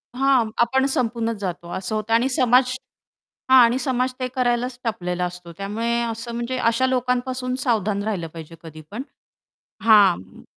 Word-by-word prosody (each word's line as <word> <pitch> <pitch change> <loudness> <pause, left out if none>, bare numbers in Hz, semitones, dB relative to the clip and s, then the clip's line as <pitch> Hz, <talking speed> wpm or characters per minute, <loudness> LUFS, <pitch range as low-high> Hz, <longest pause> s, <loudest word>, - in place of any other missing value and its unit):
हां, 260 -4 +3
आपण 265 +3 +2
संपूनच 230 -2 -1
जातो 175 -3 -5
असं 190 +3 -3
होतं 215 +1 -2
आणि 245 +4 +3
समाज 255 -1 +3 0.7
हां. 260 0 +8
आणि 235 +2 +3
समाज 255 -2 -1
ते 255 - -1
करायलाच 245 0 0
टपलेला 180 -5 -2
असतो. 175 -1 -8
त्यामुळे 230 +4 -1
असं 230 0 -4
म्हणजे 240 +2 -3
अशा 230 +2 +2
लोकांपासून 255 0 -1
सावधान 210 -4 0
राहिलं 190 -6 -3
पाहिजे 165 0 -10
कधीपण. 160 - -9 0.8
हां. 210 -3 +6
म 95 0 -15
230 Hz, 150 wpm, -22 LUFS, 200-255 Hz, 0.8 s, हां